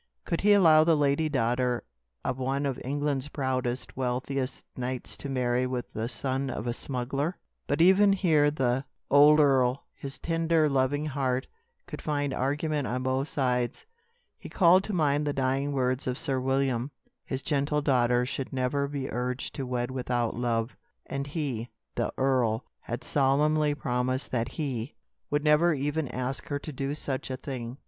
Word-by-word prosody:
Could 170 - -1
he 205 +1 +6
allow 160 -6 +7
the 160 -1 +4
lady 145 +2 +2
daughter 125 -2 0 0.4
of 130 0 -1
one 135 +2 -1
of 135 -3 -2
England's 145 0 -1
proudest, 130 -3 -2
wealthiest 130 +1 -2
knights 125 0 -4
to 140 - -6
marry 125 -1 +1
with 125 -1 -4
the 110 +2 -3
son 135 +1 -2
of 110 - -4
a 120 - -1
smuggler? 135 +7 -3 0.3
But 145 +3 +1
even 190 +3 +6
here 160 -7 +3
the 130 -3 0 0.3
old 150 +2 +7
earl, 135 -3 +3
his 135 0 -7
tender, 165 -1 +2
loving 140 +1 +1
heart, 130 -3 -1 0.4
could - - -7
find 145 -2 -1
argument 145 +1 -1
on 125 +1 -2
both 130 +2 0
sides. 125 -5 -1 0.5
He - - -9
called 185 0 +5
to 210 - -4
mind 150 -3 +2
the 145 - 0
dying 135 +1 0
words 130 -1 0
of 125 0 -1
Sir 135 -4 -1
William. 130 -1 0 0.3
His 130 0 -4
gentle 150 0 0
daughter 125 -3 +3
should 135 0 -4
never 135 +2 0
be 140 -2 -4
urged 125 +2 -3
to 135 -2 -4
wed 125 0 -2
without 125 -3 -1
love, 115 0 -1 0.3
and 140 0 -4
he 135 -7 -3 0.2
the - - -1
earl 125 -4 +1
had 120 - -5
solemnly 150 +2 +2
promised 130 -1 -1
that 115 -2 0
he 135 -4 -3 0.3
would 145 0 0
never 155 +2 +4
even 145 +2 -1
ask 130 +2 -4
her 145 - -1
to 150 +1 -7
do 135 +2 -2
such 135 -3 -3
a 130 - -3
thing. 125 -2 -6
135 Hz, 165 wpm, -28 LUFS, 125-145 Hz, 0.5 s, allow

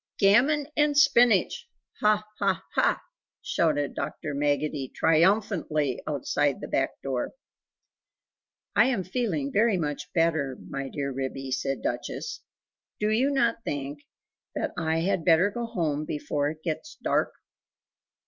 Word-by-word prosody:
"Gammon 265 +9 +4
and 295 -1 +2
spinach! 275 - +4 0.3
ha 210 0 +3 0.2
ha 195 -3 +1
HA!" - - +3 0.5
shouted 145 -4 +1
Dr. 150 - -4
Maggotty 145 -1 -1
triumphantly 165 - +2
outside 145 -1 0
the - - -6
back 135 - -1
door. 130 -3 -2 1.4
"I - - +6
am 245 -7 0
feeling 180 - -2
very 215 -1 +3
much 150 -3 -3
better, 160 -6 +1
my 135 0 -4
dear 140 0 -3
Ribby," 135 0 -4
said 135 +1 -2
Duchess. - - -3 0.6
"Do 210 0 +1
you 250 +6 +3
not 235 -4 +1
think 145 0 -4 0.6
that - - -1
I 160 0 0
had 180 -1 0
better 175 +4 +4
go 235 +2 -4
home 160 -9 -1
before 145 -1 -1
it 155 +1 -9
gets 170 - -4
dark?" - - +1
165 Hz, 130 wpm, -27 LUFS, 145-215 Hz, 1.4 s, I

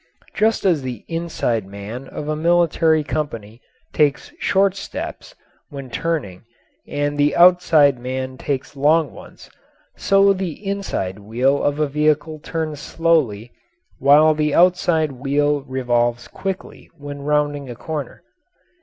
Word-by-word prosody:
Just 220 -1 +1
as 170 -6 +3
the 125 -4 -6
inside 165 - -2
man 105 +7 -8
of 150 - -7
a 155 - -1
military 165 -1 +2
company 115 -7 -5 0.3
takes 145 -2 +1
short 195 0 +2
steps 195 - -7 0.3
when 135 -3 -9
turning 140 - -3 0.4
and 145 0 -2
the 145 +1 +3
outside 165 -6 +5
man 130 +1 -4
takes 135 +1 -4
long 150 +2 +2
ones, - - -14 0.4
so 195 0 +4
the 185 -4 -3
inside 195 - -3
wheel 125 +7 0
of 145 +1 0
a 155 - +3
vehicle 150 +1 0
turns 155 -1 -4
slowly 150 -10 0 0.5
while 150 +3 +6
the 150 -1 0
outside 175 -3 +3
wheel 145 +2 0
revolves 120 -2 0
quickly 190 +7 -6
when 145 -1 -8
rounding 145 -1 -1
a 120 - -6
corner. 150 +1 -6
145 Hz, 125 wpm, -20 LUFS, 130-165 Hz, 0.5 s, while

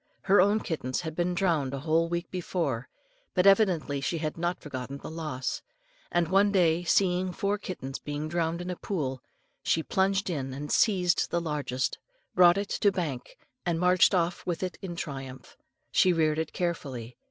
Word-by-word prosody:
Her 195 0 +5
own 205 +3 +3
kittens 130 -6 -2
had 160 -2 -5
been 175 +1 0
drowned 160 -8 +1
a - - -4
whole 165 +2 +2
week 170 0 -3
before, 165 -9 -2 0.5
but 180 0 +3
evidently 185 -8 +4
she 165 - -1
had 155 -1 -3
not 175 +1 -2
forgotten 135 -1 -6
the 140 - -8
loss; 150 -6 -3 0.5
and 175 -1 +2
one 195 +3 +4
day, 175 -3 +3
seeing 180 +1 +2
four 200 +3 -1
kittens 140 -8 -6
being 145 +1 -4
drowned 170 +1 -1
in 180 - -4
a - - -3
pool, 135 -10 -3 0.4
she 160 - +1
plunged 195 0 +1
in, 135 -4 -3
and 145 +2 -5
seizing 180 -5 +3
the 170 - 0
largest 145 -6 -2 0.3
brought 175 0 +6
it 200 0 -2
to 200 - +2
bank, 160 -10 -4 0.3
and 170 -2 0
marched 180 +2 +5
off 175 0 0
with 175 0 -2
it 185 - -3
in 180 -3 -5
triumph. 135 -5 -7 0.4
She 185 - +4
reared 155 -2 +2
it 160 - -2
carefully. 135 -9 -3
170 Hz, 175 wpm, -28 LUFS, 145-185 Hz, 0.5 s, brought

